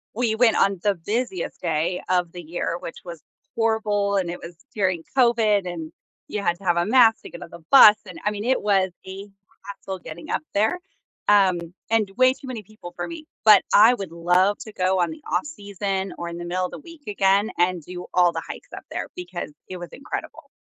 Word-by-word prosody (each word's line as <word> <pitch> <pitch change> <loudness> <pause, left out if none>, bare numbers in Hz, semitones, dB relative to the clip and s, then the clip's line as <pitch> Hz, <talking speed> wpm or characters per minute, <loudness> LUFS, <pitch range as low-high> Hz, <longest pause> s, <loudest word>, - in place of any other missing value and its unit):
we 230 -2 0
went 230 0 +4
on 195 -2 +2
the 205 -2 +1
busiest 205 +1 -3
day 170 +1 -1
of 180 -2 +1
the 175 - -8
year, 170 +1 -3
which 165 - -8
was 170 -3 -9 0.4
horrible, 215 -3 +1
and 185 -3 0
it 175 - -7
was 170 +1 -9 0.2
during 185 -5 0
COVID, 220 -6 +3
and 165 -3 -6 0.4
you 210 - -3
had 175 -3 +1
to - - -16
have 175 -2 +2
a 170 - +2
mask 225 -1 +5
to - - -9
get 175 - -9
on 170 - -11
the - - -10
bus 215 -6 +9
and, 180 -3 -9
I 210 - +1
mean, 210 +2 -5
it 260 +1 +2
was 195 -2 +2 0.2
a 195 +2 -8 0.4
hassle 195 -1 -7
getting 170 0 -10
up - - -1
there, 220 - +1 0.5
um, 195 -4 +5 0.3
and 220 -3 +2
way 255 +1 +5
too 265 - -9
many 240 -4 -6
people 200 -4 -12
for - - -3
me, 330 -2 -8 0.2
but 215 -2 +8
I 225 +4 +7
would 190 -6 -7
love 180 +4 +2
to 215 - -9
go 185 -2 +1
on 175 - 0
the 310 -2 -11
off-season 200 - -3
or 170 - -5
in 170 - -7
the 175 - -6
middle 180 +1 -1
of - - -16
the - - -8
week 335 -3 -14
again 200 +1 +2
and 175 -1 +1
do 180 +2 -8
all 180 -1 +4
the 165 0 -5
hikes - - -9
up - - -8
there - - -4
because 180 -3 -6 0.2
it 185 - -7
was 175 -1 -7
incredible. 280 +2 -7
195 Hz, 220 wpm, -23 LUFS, 175-220 Hz, 0.5 s, bus